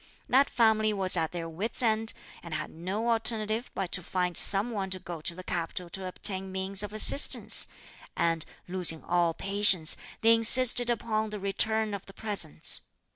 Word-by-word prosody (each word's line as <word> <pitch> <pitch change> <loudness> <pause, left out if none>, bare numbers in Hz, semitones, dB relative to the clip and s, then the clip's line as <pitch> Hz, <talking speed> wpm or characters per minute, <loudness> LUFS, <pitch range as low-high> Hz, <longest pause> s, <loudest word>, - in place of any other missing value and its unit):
That 270 +3 +3
family 215 -2 +2
was 190 -2 +2
at 160 -2 -1
their 170 -1 -6
wits' 195 +10 -5
end, 225 -1 +1 0.3
and 170 -3 -7
had 155 - -5
no 195 +8 -3
alternative 225 0 +1
but 190 -3 -4
to 180 - 0
find 180 0 -3
some 205 +5 +5
one 195 -4 -4
to 185 - -4
go 175 -3 -9
to 170 +2 -4
the 185 - -10
capital 175 0 -5
to 190 +1 -6
obtain 190 +1 -1
means 190 +1 -3
of 210 -1 -3
assistance; 215 +6 +3 0.5
and, 165 -1 0 0.2
losing 175 -3 -2
all 170 -2 0
patience, 195 -4 +4 0.3
they 225 +1 +5
insisted 245 +1 +5
upon 220 -2 -2
the 210 0 -7
return 215 +2 -1
of 200 -1 -7
the 195 - -12
presents. 200 - -2
195 Hz, 175 wpm, -27 LUFS, 180-220 Hz, 0.5 s, some